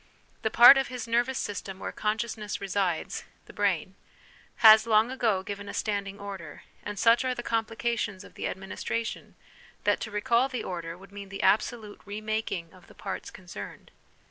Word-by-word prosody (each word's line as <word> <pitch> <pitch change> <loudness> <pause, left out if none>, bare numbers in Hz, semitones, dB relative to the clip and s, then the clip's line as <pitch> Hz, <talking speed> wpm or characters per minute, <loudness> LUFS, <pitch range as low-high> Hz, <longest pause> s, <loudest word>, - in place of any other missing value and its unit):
The 220 - +1
part 240 +5 +9
of 270 - -1
his 250 -2 -6
nervous 240 +3 +1
system 195 -2 -4
where - - -5
consciousness 215 -1 -2
resides 195 -3 -1 0.2
(the - - -14
brain) - - 0 0.7
has 220 +1 +9
long 220 +2 +4
ago 220 -7 +1
given 200 0 -6
a - - -6
standing 200 -1 -2
order, 195 -4 -8 0.2
and 210 0 -6
such 230 +4 +5
are 255 -1 0
the 240 - -5
complications 225 -3 -1
of - - -15
the - - -3
administration, 205 +4 -4 0.5
that - - +2
to 225 - -5
recall 235 +4 +2
the 255 -3 -4
order 170 -2 -5
would 195 +1 -15
mean 200 -1 -9
the 195 - -5
absolute 215 -1 +1
re 205 +1 -6
making 215 -6 -3
of 185 -1 -18
the - - -17
parts 195 - -5
concerned. 170 - -10
210 Hz, 170 wpm, -28 LUFS, 195-230 Hz, 0.7 s, part